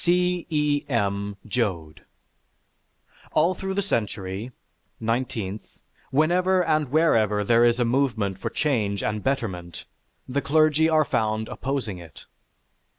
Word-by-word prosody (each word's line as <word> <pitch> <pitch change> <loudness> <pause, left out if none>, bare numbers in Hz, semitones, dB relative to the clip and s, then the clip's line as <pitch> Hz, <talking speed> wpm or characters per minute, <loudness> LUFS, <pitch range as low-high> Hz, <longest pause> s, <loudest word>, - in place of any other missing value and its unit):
C. 180 0 +1
E. 150 -2 +1
M. 100 -4 -1
JOAD 95 - -2 1.3
All 165 +4 +3
through 190 0 -4
the 200 - 0
century 105 - -3 0.5
(nineteenth), 115 -3 -3 0.3
whenever 180 +5 +3
and 155 -3 +1
wherever 110 -9 +3
there 115 +3 +4
is 120 0 +3
a 120 - +3
movement 115 -6 0
for - - -3
change 110 -9 0
and 105 0 -1
betterment, 95 -11 -3 0.4
the 140 +2 -1
clergy 155 +2 +3
are 155 -1 +4
found 110 -2 0
opposing 125 -9 -3
it. 80 -5 -13
120 Hz, 120 wpm, -25 LUFS, 105-155 Hz, 1.3 s, there